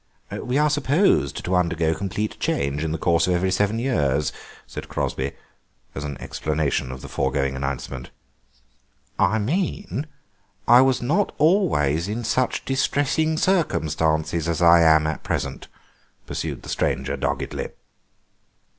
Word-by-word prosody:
"We 125 +2 -2
are 150 0 +3
supposed 150 - +2
to 90 - -1
undergo 85 -2 +1
complete 100 +4 -3
change 70 +2 -1
in 80 - -1
the 80 - -1
course 85 +2 +2
of 90 - +2
every 95 +2 +1
seven 105 +3 +1
years," 75 - 0 0.3
said - - -8
Crosby, 65 +1 -2 0.6
as 70 - -5
an 70 -2 -5
explanation 75 -4 -2
of 65 0 -8
the - - -7
foregoing 65 0 -1
announcement. 65 -1 -4 1.1
"I 110 +5 +3
mean 160 - -2 0.6
I 120 +1 +8
was 130 -2 +2
not 170 +11 +1
always 145 - +2
in 110 +3 -3
such 130 +3 0
distressing 145 +4 +1
circumstances 80 - +1
as 85 - -1
I 85 -1 +7
am 80 -1 +5
at 80 -1 -2
present," - - -3 0.6
pursued - - -4
the - - -9
stranger 70 +1 -1
doggedly. 70 - -3
85 Hz, 135 wpm, -23 LUFS, -, 1.1 s, I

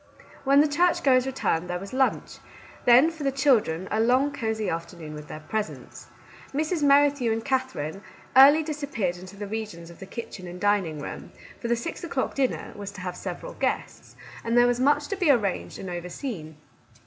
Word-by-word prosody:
When 275 +1 +6
the 305 - +4
churchgoers 290 -5 +3
returned 180 -10 -1
there 180 - -1
was 195 +4 -9
lunch; 265 0 0 0.5
then, 255 +7 +7
for 320 -2 -8
the 275 - +1
children, 230 - +2
a 220 - +1
long, 255 +5 +3
cosey 220 -5 -2
afternoon 165 -1 -5
with 150 0 -9
their 155 - -8
presents. 215 +6 -5 0.5
Mrs. 315 +3 0
Merri 285 0 +6
thew 250 -5 -1
and 225 0 -2
Katherine 260 - -2 0.3
early 285 +4 +8
disappeared 285 - -3
into 185 +2 -11
the 205 +1 -6
regions 205 -5 -6
of 170 - -15
the 195 - -9
kitchen 195 -4 -7
and 175 +1 -8
dining 200 -6 +1
room, 145 - -7 0.3
for 235 - -4
the 235 - +2
six 235 - -6
o'clock 275 -6 -2
dinner 265 -2 -1
was 205 -1 -6
to 190 - -9
have 180 -1 -4
several - - -6
guests, - - -3 0.3
and 230 +1 +1
there 240 - +7
was 245 0 +1
much 290 +2 +3
to 400 - -1
be 365 -5 +1
arranged 210 -9 +1
and 190 - -7
over 175 0 -5
seen. 170 - -6
230 Hz, 190 wpm, -26 LUFS, 180-275 Hz, 0.5 s, early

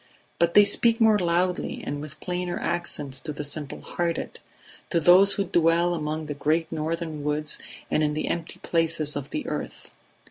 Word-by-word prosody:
But 170 0 +2
they 205 - +8
speak 230 +3 +3
more 220 -2 +5
loudly 180 +1 0
and 145 0 -4
with 150 0 -9
plainer 180 -1 -3
accents 145 -6 -2
to 155 - -5
the 150 0 -5
simple 145 0 -2
hearted, 170 -1 -3 0.5
to 170 - +2
those 185 +5 +6
who 200 - 0
dwell 170 -1 +2
among 155 -1 -3
the 150 - -4
great 155 +3 0
northern 160 -1 -3
woods 150 +1 -1 0.3
and - - +2
in 150 -1 +1
the 155 - -2
empty 170 -1 -4
places 165 -3 +1
of 145 -1 -5
the 300 - -4
earth. - - -6
165 Hz, 175 wpm, -25 LUFS, 150-175 Hz, 0.5 s, they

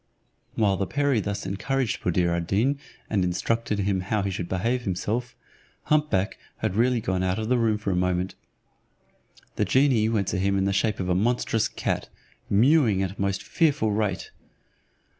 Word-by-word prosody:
While 100 -3 +2
the 95 - -1
perie 145 -4 +1
thus 100 0 -3
encouraged 130 +5 -1
Buddir 85 0 +1
ad 85 -1 -3
Deen, 130 +10 +1 0.3
and 100 -4 +1
instructed 105 +5 -1
him 100 -1 0
how 100 +2 -1
he 100 - -1
should 90 -2 -4
behave 115 +7 0
himself, 115 +4 -2 0.5
hump 150 0 +2
back 95 0 0 0.2
had 90 - -2
really 120 +2 +3
gone 95 -3 -1
out 95 0 0
of 110 0 -3
the 125 - +3
room 110 -2 +2
for 105 -2 -2
a - - 0
moment. 90 0 0 1.2
The - - +2
genie 120 0 +3
went 105 -4 0
to - - -1
him 100 +1 +1
in 95 - +1
the 100 - +1
shape 105 +1 0
of 90 - -2
a - - +3
monstrous 115 +2 +1
cat, - - -3 0.4
mewing 115 -3 +4
at 95 0 -3
a - - -6
most 100 -1 -1
fearful 145 -9 +1
rate. 100 -4 -1
105 Hz, 180 wpm, -25 LUFS, 95-115 Hz, 1.2 s, mewing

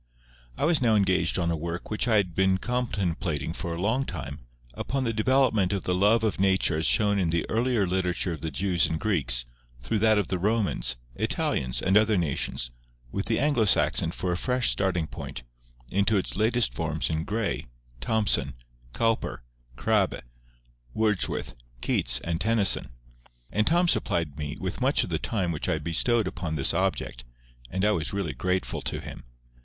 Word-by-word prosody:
I - - 0
was 160 -3 +3
now 115 -3 +4
engaged 95 -3 +2
on 85 -2 0
a - - 0
work 85 +5 -5
which 110 +3 -1
I 115 - +3
had 95 -5 +2
been 95 +1 +2
contemplating 95 - -2
for 85 -1 -4
a - - -6
long 110 +8 +1
time, - - -6 0.3
upon 135 - -2
the 115 -2 -1
development 110 -4 +2
of 100 - -2
the 90 - 0
love 105 +5 +3
of 110 -4 0
Nature 95 -4 +2
as 80 - +2
shown 100 - +3
in 90 -3 +1
the 85 0 0
earlier 115 -2 +2
literature 90 -1 -1
of 80 - -8
the 80 - -2
Jews 90 0 +1
and 80 - -2
Greeks, 70 - 0 0.4
through 110 - 0
that 110 0 +4
of 100 -4 0
the 95 -2 -1
Romans, 105 - +1 0.2
Italians, 60 +1 -1
and 95 - +2
other 110 0 +4
nations, 70 -6 -1 0.4
with 100 - -3
the 115 - +1
Anglo 140 -4 +2
Saxon 90 -4 +3
for 90 +2 -3
a 90 - 0
fresh 125 +3 +1
starting 90 -4 0
point, 75 - -7 0.5
into 100 +2 +2
its 95 - -2
latest 115 +3 +2
forms 80 0 -2
in 80 0 -1
Gray, 105 - -2 0.3
Thomson, 105 - +1 0.4
Cowper, 115 - 0 0.3
Crabbe, - - +1 0.7
Wordsworth, 105 - 0 0.3
Keats, - - +1
and 85 +1 -2
Tennyson; 105 - +3 0.6
and 110 +1 +1
Tom 175 +2 +3
supplied 80 - 0
me 75 -1 -4
with 95 +5 -4
much 135 +3 +3
of - - -6
the 80 - 0
time 95 -7 -1
which 80 +2 -3
I 80 - +1
bestowed 90 +9 +1
upon 85 -3 -4
this 70 - +4
object, 75 -10 -1 0.5
and 95 +6 -1
I 105 - +4
was 80 -4 -2
really 100 -6 -2
grateful 90 0 -1
to - - -3
him. - - -9
95 Hz, 180 wpm, -27 LUFS, 85-110 Hz, 0.7 s, now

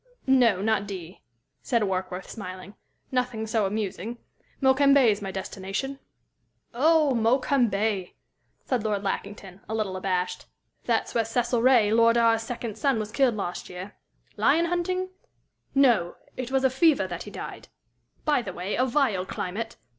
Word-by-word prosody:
"No, 245 -7 +4
not 215 -2 +1
D 185 -3 -8 0.2
," - - -53
said 235 -4 +1
Warkworth, 185 -1 -3
smiling. 185 -2 -8 0.4
"Nothing 250 -3 -1
so 220 -2 +1
amusing. 210 +2 -4 0.4
Mokembe's 265 -5 +4
my 195 - -4
destination." 195 +8 -4 0.7
"Oh, 305 +3 +4
Mokembe!" 225 -5 +1 0.5
said 250 -5 0
Lord 205 -2 -1
Lackington, 195 -1 -5
a 220 - -2
little 210 -4 -2
abashed. 185 -1 -2 0.4
"That's - - 0
where 230 - +2
Cecil 235 +1 0
Ray, 240 -4 +5
Lord 230 +1 +5
R's 230 -1 +4
second 225 -2 -5
son, 275 +1 +2
was 215 -1 -4
killed 255 -2 +2
last 180 -4 -4
year 185 +3 -8 0.4
lion 335 +1 +3
hunting? 365 +2 -1 0.7
No, 240 -11 +3 0.2
it 255 -1 -4
was 265 0 +1
of 260 -1 +3
fever 310 +2 +4
that - - -6
he - - -7
died. - - -8 0.6
By 295 -4 +3
the 190 -6 -6
way, 180 +4 -4
a 255 - +2
vile 235 -9 +1
climate!" 215 +5 -4
225 Hz, 145 wpm, -26 LUFS, 195-260 Hz, 0.7 s, Ray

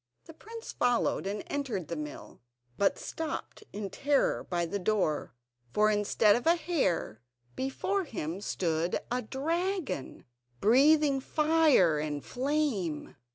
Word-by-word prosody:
The 325 - -12
prince 455 +7 -9
followed 245 -5 +1
and 205 +1 -3
entered 245 - -3
the 170 - -4
mill, 150 -2 -8 0.3
but 200 - +2
stopped 320 +6 -5
in 200 -2 -5
terror 280 +4 +1
by 175 -1 -1
the 200 +5 -3
door, 180 - 0 0.4
for, 215 0 +4
instead 210 0 +3
of 240 +6 -2
a 335 - +6
hare, 310 - -1 0.3
before 360 +9 -1
him 185 - -5
stood 170 -3 -1
a 250 +1 0
dragon, 330 - -3 0.3
breathing 280 - +5
fire 300 - +3
and 150 -1 -3
flame. 255 - -1
240 Hz, 125 wpm, -30 LUFS, -, 0.4 s, a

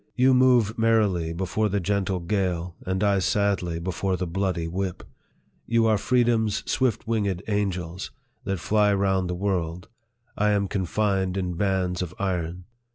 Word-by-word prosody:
You 130 +1 +4
move 125 -4 +4
merrily 105 -7 +2
before 95 +5 -1
the 100 +1 0
gentle 95 0 -1
gale, 90 -2 -1
and 95 +2 0
I 100 -1 +3
sadly 95 -4 0
before 95 +2 -2
the 90 - -2
bloody 90 -1 -1
whip! 95 +1 -3 0.6
You 115 0 +3
are 110 -2 +3
freedom's 115 -3 +1
swift 130 -5 0
winged 100 -5 -1
angels, 95 -4 -2 0.3
that 95 -1 -2
fty 105 +2 +2
round 95 -2 +1
the 90 - -2
world; 90 -3 -2 0.5
I 105 0 +2
am 100 -1 +1
confined 95 0 0
in 90 -2 -2
bands 90 -1 0
of 90 -1 -5
iron 90 -2 -2
95 Hz, 150 wpm, -25 LUFS, 90-105 Hz, 0.6 s, You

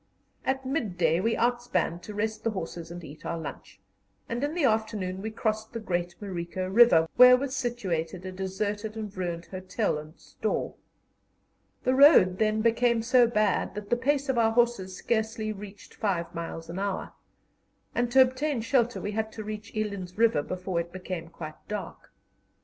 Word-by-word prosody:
At 265 0 -1
midday 180 - +1
we 225 +4 +1
outspanned 240 -8 0
to 210 +2 -8
rest 215 +1 -2
the 230 - +1
horses 170 -4 -5
and 175 0 -8
eat 155 0 -11
our 170 - -3
lunch, 165 - -8 0.5
and 235 +3 -3
in 295 +3 -1
the 345 - 0
afternoon 215 -6 0
we 220 - -3
crossed 220 0 -2
the 230 - -3
great 175 -4 -2
Marico 185 -2 -4
River, 190 -5 +6
where 250 0 +9
was 270 0 -3
situated 185 - -2
a 185 - -4
deserted 205 +3 -3
and 210 -2 -6
ruined 175 -2 -3
hotel 185 -1 -2
and 155 +2 -12
store. - - -3 1.1
The 255 - +2
road 260 - +7
then 215 0 +2
became 235 0 +3
so 245 0 +5
bad 215 -4 +1
that 210 -1 -7
the - - +5
pace 280 +3 0
of 260 -3 +1
our 225 -1 +3
horses 230 -6 +1
scarcely 220 -1 -1
reached 200 0 -11
five 170 -5 -2
miles 165 -1 -5
an 170 +3 -5
hour, 200 -1 -3 0.8
and 240 0 0
to 265 +1 +8
obtain 260 0 -1
shelter 240 0 +1
we 205 - -3
had 220 +1 -2
to 220 - -6
reach 215 +1 -6
Eland's 200 -4 -3
River 225 -9 +4
before 185 +2 -3
it 170 0 -4
became 180 -2 -5
quite 155 -2 -10
dark. 205 -5 -6
210 Hz, 170 wpm, -28 LUFS, 185-235 Hz, 1.1 s, where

